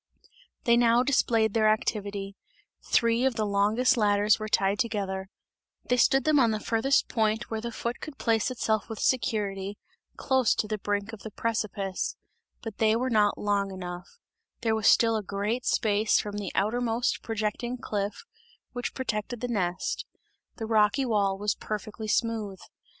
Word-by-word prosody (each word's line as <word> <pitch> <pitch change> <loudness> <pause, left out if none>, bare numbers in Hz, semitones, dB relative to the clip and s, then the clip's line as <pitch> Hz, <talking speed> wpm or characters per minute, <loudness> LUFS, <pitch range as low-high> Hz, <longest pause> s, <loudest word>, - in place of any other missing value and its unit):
They 235 0 +4
now 240 0 +4
displayed 230 -5 +2
their 215 -1 +4
activity; 200 -2 -2 0.5
three 230 +1 +3
of 265 -2 +2
the 215 -2 0
longest 210 +5 +2
ladders 205 0 +3
were 215 - -4
tied 200 0 +2
together; 195 -4 -2 0.6
they 250 - +3
stood 270 +2 +4
them 305 -2 +4
on 240 -3 +4
the 215 -1 -1
farthest 235 +6 +1
point 220 0 0
where 220 -1 -2
the 235 +1 -4
foot 235 +1 -4
could 305 -3 -8
place 225 0 +1
itself 220 -4 -1
with 225 - -5
security, 205 -5 -1 0.4
close 260 -4 +2
to 215 - -1
the 215 0 -3
brink 205 +2 -2
of 220 - -8
the 220 - -7
precipice 210 -3 -2 0.5
but 225 -3 -7
they 220 0 +4
were 255 +2 -1
not 210 -2 +3
long 200 -1 0
enough; 180 - -8 0.4
there 225 -1 +1
was 220 -2 +1
still 225 -1 +5
a 215 - 0
great 205 +5 -3
space 215 0 +2
from 205 -1 -4
the 200 -3 -4
outermost 235 +3 0
projecting 225 +2 -3
cliff, 205 -4 -3 0.5
which 245 -1 -4
protected 240 -2 -3
the 245 - -3
nest; 185 -6 -2 0.5
the 225 - -5
rocky 220 +4 +3
wall 200 -4 +1
was 205 +1 0
perfectly 215 +1 -6
smooth. 215 -3 -1
220 Hz, 160 wpm, -27 LUFS, 205-235 Hz, 0.6 s, still